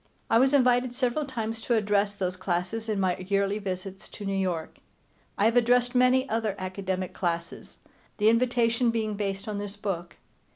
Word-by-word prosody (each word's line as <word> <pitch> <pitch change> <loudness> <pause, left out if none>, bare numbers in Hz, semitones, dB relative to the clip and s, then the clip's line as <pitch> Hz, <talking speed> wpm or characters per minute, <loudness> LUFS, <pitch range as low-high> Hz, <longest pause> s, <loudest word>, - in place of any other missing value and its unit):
I 225 - +6
was 265 +1 +4
invited 250 -2 +3
several 260 +3 0
times 225 -4 -4
to 235 - +1
address 205 -1 +1
those 185 -2 -2
classes 185 +5 -2
on 210 -2 0
my 185 -2 +1
yearly 200 +2 0
visits 190 0 -6
to 205 - -9
New 195 - -1
York. 180 -4 -2 0.6
I 205 - +2
have 225 +1 +3
addressed 245 +1 +3
many 255 +1 +4
other 220 -3 -1
academic 185 -1 -3
classes, 170 -2 -4 0.4
the 210 - +2
invitation 235 0 +3
being 220 -2 -1
based 195 -1 -3
on 210 -1 -3
this 205 0 -6
book. 185 -5 -4
210 Hz, 170 wpm, -27 LUFS, 190-235 Hz, 0.6 s, I